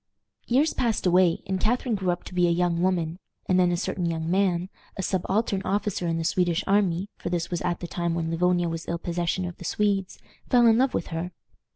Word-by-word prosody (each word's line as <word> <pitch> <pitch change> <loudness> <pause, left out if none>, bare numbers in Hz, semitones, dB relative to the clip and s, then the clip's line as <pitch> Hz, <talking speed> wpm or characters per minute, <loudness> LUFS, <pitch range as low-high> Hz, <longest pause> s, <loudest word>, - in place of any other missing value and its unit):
Years 280 +6 +3
passed 230 -6 0
away, 180 -1 +3
and 190 -1 -2
Catharine 245 +3 0
grew 190 -3 -1
up 175 -1 -1
to - - -10
be 180 -1 +3
a - - +2
young 170 0 +1
woman, 175 -2 0 0.3
and 185 0 +2
then 180 -1 +4
a 175 - 0
certain 175 -1 -2
young 165 0 -2
man, 185 -2 +1 0.3
a 190 - -2
subaltern 195 +2 0
officer 200 -3 -1
in 165 0 0
the 165 - -2
Swedish 175 +1 +1
army 195 -2 +1
for - - -4
this 175 -1 -2
was 175 - -2
at 175 -1 -2
the 175 - -4
time 170 -1 -2
when 165 -1 -2
Livonia 175 +1 +2
was 165 -1 -5
ill 170 - -1
possession 175 +2 -2
of 175 -1 -6
the - - -10
Swedes 195 +1 0 0.3
fell 245 -1 +5
in 225 0 +5
love 265 +1 +2
with - - -2
her. 170 +2 -4
180 Hz, 225 wpm, -26 LUFS, 170-195 Hz, 0.3 s, fell